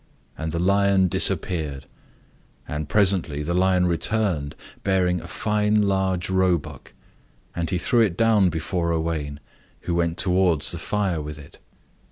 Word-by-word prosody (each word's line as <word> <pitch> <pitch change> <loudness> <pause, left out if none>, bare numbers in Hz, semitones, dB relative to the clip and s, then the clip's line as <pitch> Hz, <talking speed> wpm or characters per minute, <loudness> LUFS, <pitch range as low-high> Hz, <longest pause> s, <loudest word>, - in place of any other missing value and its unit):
And 80 0 -4
the 85 - -2
lion 100 +1 +2
disappeared. 75 -6 0 0.8
And 75 0 -5
presently 95 -8 +2
the 85 +3 -2
lion 90 0 +2
returned, 85 -4 0 0.3
bearing 90 -3 +1
a 90 - -10
fine 105 +3 0
large 95 -2 0
roebuck. 95 -4 -1 0.6
And 85 -1 -2
he 90 - 0
threw 120 +8 +1
it 95 -6 +1
down 110 -5 +3
before 85 +1 -2
Owain, 80 -3 -3 0.4
who 85 - -3
went 85 0 0
towards 90 -3 +2
the 85 - -4
fire 95 -3 -1
with 75 0 -7
it. 75 0 -14
90 Hz, 140 wpm, -23 LUFS, 80-95 Hz, 0.8 s, down